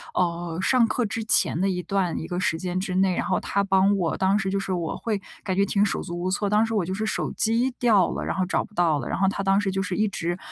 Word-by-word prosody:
呃， 170 -1 -1
上 240 +2 +3
课 235 +2 0
之 220 +1 -3
前 195 -5 +2
的 195 - +1
一 180 -1 -2
段 185 -1 -1
一 - - -5
个 180 0 -3
时 160 -3 0
间 180 +1 -3
之 185 -1 -3
内， 190 -1 +2
然 - - -1
后 185 - +1
他 200 - -1
帮 195 +1 +3
我 175 -4 -1
当 190 +2 +2
时 195 - -1
就 195 +1 0
是 195 -1 -3
我 170 -2 -3
会 215 -4 -2 0.2
感 190 - -2
觉 195 - +3
挺 205 +1 +2
手 200 - -2
足 175 -1 -6
无 185 +1 -1
措， 200 +1 0
当 210 +2 +3
时 225 - -4
我 205 - +1
就 185 +2 -3
是 215 - -2
手 - - -2
机 230 +3 +1
掉 215 -7 +4
了， - - -4
然 - - -2
后 190 - 0
找 185 - 0
不 210 - -22
到 170 -5 +2
了。 - - -5
然 - - -2
后 195 - +3
他 195 +1 -1
当 195 +1 +3
时 195 -2 -1
就 195 0 -1
是 180 -1 -3
一 215 0 +2
直， 175 -2 -3
195 Hz, 320 characters per minute, -24 LUFS, 180-205 Hz, 0.2 s, 掉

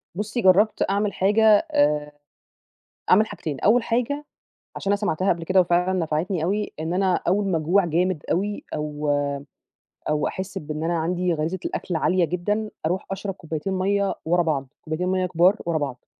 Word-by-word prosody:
بُصّي، 215 +5 -2
جرّبت 195 +3 +4
أعمل 200 0 0
حاجة، 205 +4 +2 0.3
آآ 150 0 +2 1.0
أعمل 210 +4 +6
حاجتين، 160 -10 -6
أول 235 +4 +4
حاجة 250 +6 -1 0.5
عشان 195 - -2
أنا - - +4
سمعتها 200 -2 0
قبل 170 -1 -8
كده 185 +3 +3
وفعلاً 180 +1 +1
نفعتني 165 +2 -1
أوي 205 +5 -1
إن 160 +2 -2
أنا 185 0 +2
أول 200 +4 +2
ما 180 -4 +1
أجوع 175 +5 +2
جامد 175 0 0
أوي 205 +4 -1
أو 150 0 -3 1.0
أو 150 0 +1
أحس 190 +1 -4
بإن 150 +1 -5
أنا 170 0 0
عندي 175 +2 0
غريزة 160 +4 -2
الأكل 175 - -3
عالية 180 +2 +2
جدًا، 205 +6 -2 0.2
أروح 180 +4 -1
أشرب 195 0 -4
كوبايتين 165 +1 -4
مَيّة 195 +1 +1
ورا 175 +2 +2
بعض، 145 -5 -1
كوبايتين 160 +3 -3
مَيّة 185 0 +1
كبار 180 +3 +3
ورا 170 -2 +1
بعض، 140 -4 -5
180 Hz, 165 wpm, -24 LUFS, 160-200 Hz, 1.0 s, أعمل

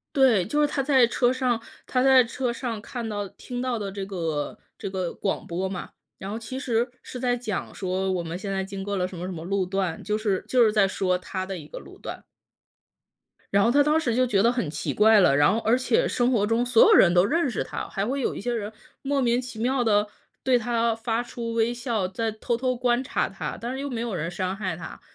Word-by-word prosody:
对， 250 -9 +5
就 295 +8 0
是 295 - +5
他 290 -1 -1
在 265 -3 +5
车 245 +1 +2
上 255 -3 0 0.3
他 255 - +1
在 265 -2 +6
车 240 +1 -2
上 235 -3 -4
看 235 +1 -6
到 205 -2 -3
听 245 +5 -7
到 250 -2 -1
的 200 -2 -4
这 195 -1 -4
个 165 -6 -3 0.2
这 - - -4
个 185 -2 -2
广 195 - -2
播 185 +3 -2
嘛。 185 -1 -6 0.3
然 190 - -7
后 210 - -4
其 230 +3 -6
实 240 -2 0
是 250 - -8
在 245 -1 +1
讲 220 -6 -4
说， 190 0 -1
我 185 -2 0
们 165 +1 -4
现 195 +2 -5
在 195 0 -1
经 195 0 -6
过 200 +1 -3
了 180 -1 0
什 185 - -9
么 175 - -5
什 185 - -4
么 165 -2 -7
路 195 +1 0
段， 185 -3 -2
就 210 +1 -1
是 205 -4 -1
就 250 -2 +5
是 215 - +3
在 205 -2 +4
说 185 -1 0
他 185 +1 -5
的 190 -1 -4
一 150 -3 -10
个 - - -7
路 - - -13
段。 - - -7 1.3
然 200 0 +4
后 230 - +4
他 285 +4 +5
当 300 +2 +3
时 240 -7 0
就 255 +1 +3
觉 200 -5 +2
得 235 - +4
很 240 -12 -2
奇 150 - -3
怪 215 0 +6
了， 175 -7 +5
然 145 0 +5
后 225 - +1
而 230 +3 +2
且 465 - +2
生 245 +1 +1
活 210 -5 +2
中 230 +2 +2
所 235 -2 +6
有 - - +6
人 175 -2 +7
都 175 +1 +5
认 310 +6 +1
识 - - -2
他， - - -5
还 195 0 -2
会 275 +3 -1
有 - - -1
一 - - -6
些 245 +5 -2
人 210 -2 -3 0.3
莫 275 0 0
名 240 0 +2
其 250 -3 -9
妙 250 +3 +1
地 210 -2 +3 0.4
对 255 -2 +4
他 235 0 +1
发 225 +1 -1
出 235 -1 -5
微 230 +1 +2
笑， 235 -5 -1
在 220 +4 -2
偷 220 +2 -2
偷 255 0 0
观 245 0 +1
察 265 - -1
他， 195 - -5
但 235 +2 -4
是 265 - -4
又 285 - -3
没 240 -4 -4
有 235 -4 -3
人 165 0 -2
伤 185 +1 -2
害 190 -5 -3
他， 175 - -9
225 Hz, 270 characters per minute, -25 LUFS, 195-245 Hz, 1.3 s, 人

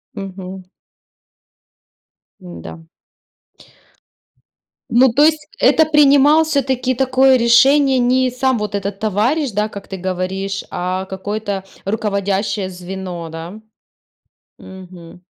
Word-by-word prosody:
Мгм. 190 -1 -8 1.8
М-да. 80 -2 -10 2.1
Ну 245 +1 +4
то 290 - +4
есть 310 -1 +2
это 315 - +4
принимал 295 +1 +5
всё-таки 265 -4 -1
такое 260 0 +3
решение 265 +3 +4
не 255 +1 +2
сам 260 0 0
вот 210 -1 -4
этот 200 0 -4
товарищ, 230 +7 0
да, 210 +2 -1
как 200 -1 -10
ты 190 - -7
говоришь, 190 +2 -3
а 185 +1 -3
какое-то 200 +1 -4 0.2
руководящее 200 -1 -2
звено, 180 -2 -7
да? 165 +6 -8 1.0
Мгм. 180 -2 -13
205 Hz, 100 wpm, -18 LUFS, 190-260 Hz, 2.1 s, принимал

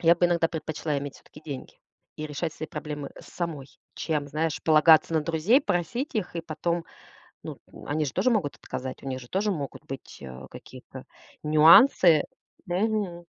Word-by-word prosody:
Я 170 0 +6
бы 175 +1 +3
иногда 170 -1 +2
предпочла 155 -2 -3
иметь 140 0 -6
всё-таки 150 - -16
деньги 140 -4 -7 0.4
и 155 - -4
решать 150 +2 -4
свои 155 - -6
проблемы 150 -3 -6
самой, 160 -6 -5 0.3
чем, 150 -3 -2
знаешь, 155 +2 -2
полагаться 160 +1 +5
на 160 - +3
друзей, 165 - +3
просить 240 - -2
их. 195 -6 -3
И - - -1
потом, 170 +1 -3 0.6
ну, - - -7 0.3
они 150 +1 -1
же 135 - -4
тоже 255 - +2
могут 200 - 0
отказать. 130 0 -7
У - - -7
них 130 -1 -3
же 125 - -12
тоже 205 +2 0
могут 145 -8 -5
быть, 135 0 -9
э, 65 0 -9
какие-то - - -12 0.4
нюансы. 160 - +7 0.4
Мгм. 185 -2 -1
160 Hz, 165 wpm, -26 LUFS, 145-175 Hz, 0.6 s, нюансы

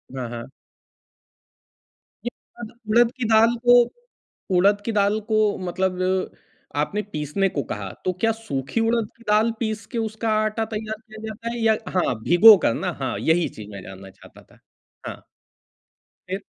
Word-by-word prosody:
हाँ, 130 -2 -4
हाँ। 120 0 -7 1.8
ये - - 0 0.3
अद 220 - -7 0.2
उड़द 235 +2 +5
की 250 - -2
दाल 225 +2 +5
को, 245 0 +8 0.8
उड़द 200 +3 +4
की 230 - -1
दाल 205 0 +2
को 215 - +4 0.3
मतलब 185 +1 -1 0.7
आपने 150 +8 0
पीसने 150 +6 0
को 145 -5 -3
कहा 100 -2 -4
तो 185 - +1
क्या 225 - +3
सूखी 220 - -4
उड़द 230 -3 0
की 235 - -18
दाल 215 +2 +4
पीस 220 -2 -3
के 240 - -4
उसका 220 0 -2
आटा 215 +1 -1
तैयार 215 0 -4
किया 220 -1 -13
जाता 220 +2 -6
है? 240 - -5
या 220 -1 +4
हाँ, 180 -9 0
भिगो 205 - +8
कर - - +3
ना। 185 -1 -2
हाँ, 130 -3 -2
यही 165 +1 +2
चीज़ 105 -1 -11
मैं 100 -2 -8
जानना 95 0 -11
चाहता - - -17
था। - - -24 0.5
हाँ। - - -8 1.0
फिर? 190 +2 -4
210 Hz, 165 wpm, -23 LUFS, 160-225 Hz, 1.8 s, को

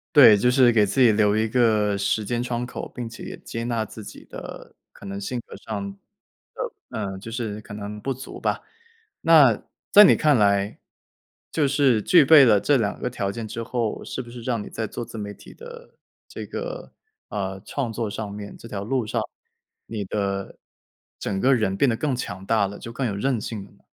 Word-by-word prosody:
对， 125 -8 +9
就 125 +5 +3
是 125 -1 +5
给 110 -3 +4
自 105 - -2
己 120 -3 +7
留 105 -1 +3
一 110 +1 +1
个 110 -4 +2
时 100 +2 0
间 120 +3 -1
窗 120 0 -2
口， 125 - -6
并 120 -2 -4
且 115 +1 -10
也 - - -7
接 115 - -6
纳 115 -2 -1
自 110 +1 -10
己 - - -11
的 - - -10 0.2
可 - - -14
能 100 0 -5
性 120 +5 -3
格 - - -11
上 100 -3 -5
的 100 - -16 0.9
嗯， 95 -3 -4
就 110 +4 -9
是 110 -3 -4
可 105 - -10
能 105 0 -6
不 135 +4 -2
足 130 +2 -9
吧。 - - -1 0.6
那 145 -9 +6 0.3
在 210 - +10
你 - - +7
看 150 -2 +3
来， 100 -1 +2 0.7
就 150 -3 +1
是 135 -5 +3
具 170 - +6
备 145 0 +8
了 105 -5 +5
这 145 - +3
2 105 -5 -1
个 125 - -2
条 100 -5 -2
件 115 +1 -6
之 115 +2 -5
后， 115 -1 -2
是 - - -5
不 120 - -12
是 120 0 -9
让 115 -2 -1
你 - - -8
在 110 - -4
做 120 - -6
自 115 - -9
媒 100 -1 -5
体 - - -14
的 480 +1 -12 0.3
这 - - -7
个， - - -6 0.4
呃， 95 -2 -4
创 125 -2 -3
作 115 0 -2
上 105 0 -5
面， 100 0 -8
这 115 - -12
条 100 -2 -5
路 125 +2 0
上， - - -1 0.7
你 110 -3 -4
的 100 0 -3 0.6
整 95 -2 -2
个 135 +4 +4
人 110 -5 0
变 140 - +3
得 115 - +1
更 145 +2 -1
强 95 -6 -5
大 110 -2 +3
了， 100 - -9
就 115 - -8
更 130 +2 -2
有 105 -4 -2
韧 125 +2 0
性 105 -2 -5
了 - - -17
呢？ - - -27
115 Hz, 230 characters per minute, -24 LUFS, 105-125 Hz, 0.9 s, 在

